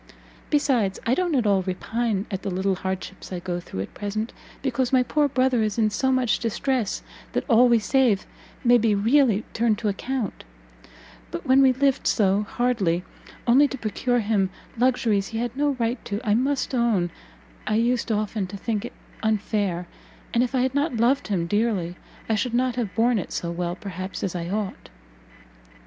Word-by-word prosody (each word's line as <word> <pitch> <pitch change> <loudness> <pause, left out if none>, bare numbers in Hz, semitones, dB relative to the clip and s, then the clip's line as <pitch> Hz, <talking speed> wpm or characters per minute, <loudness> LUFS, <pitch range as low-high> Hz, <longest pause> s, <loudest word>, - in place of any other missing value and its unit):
Besides, 255 -10 +1
I 235 - +2
don't 350 +1 +1
at 245 -4 +2
all 200 -2 +3
repine 205 +3 -2
at 190 -1 -3
the 200 - -3
little 190 +1 0
hardships 190 +1 -5
I 185 - -3
go 175 0 -3
through 95 - -6
at 95 - -7
present, 215 +2 -3 0.3
because 260 -2 0
my 255 -1 +4
poor 295 +3 +2
brother 255 -3 +2
is 215 -1 -1
in 215 -2 +2
so 265 +6 +1
much 255 -3 +2
distress, 235 -1 -1 0.3
that - - -1
all 245 -1 +6
we 235 - +6
save 230 -2 +2 0.4
may 245 -1 +6
be 215 -2 +2
really 225 0 +3
turned 225 -2 +2
to 220 -1 -1
account; 235 +2 -3 0.9
but - - -6
when 260 +1 +5
we 265 -1 +6
lived 270 +1 +1
so 200 -2 +3
hardly 200 -9 +1 0.4
only 265 +5 +6
to 270 - -6
procure 245 +2 0
him 205 -3 +1 0.3
luxuries 230 -5 +2
he 225 - -5
had 240 +1 -2
no 290 +1 +1
right 235 +1 -1
to, 205 - -3
I 205 - +4
must 270 +4 0
own 225 -8 +2 0.6
I 215 - +1
used 235 +1 +1
often 210 -2 -1
to 200 - -7
think 215 0 -2
it - - -8 0.3
unfair, 205 -4 0 0.5
and 235 - +3
if 250 +2 0
I 255 - +3
had 260 +1 +1
not 285 -3 0
loved 250 +5 +2
him 185 -5 0
dearly, 200 -3 0 0.3
I 225 - +1
should 235 +3 0
not 250 0 +1
have 230 -6 -3
borne 230 0 +3
it 180 - -6
so 170 - -3
well, 175 0 -2
perhaps, 190 -1 -6
as 190 - -1
I 170 0 -3
ought." 205 0 -4
225 Hz, 185 wpm, -24 LUFS, 195-250 Hz, 0.9 s, all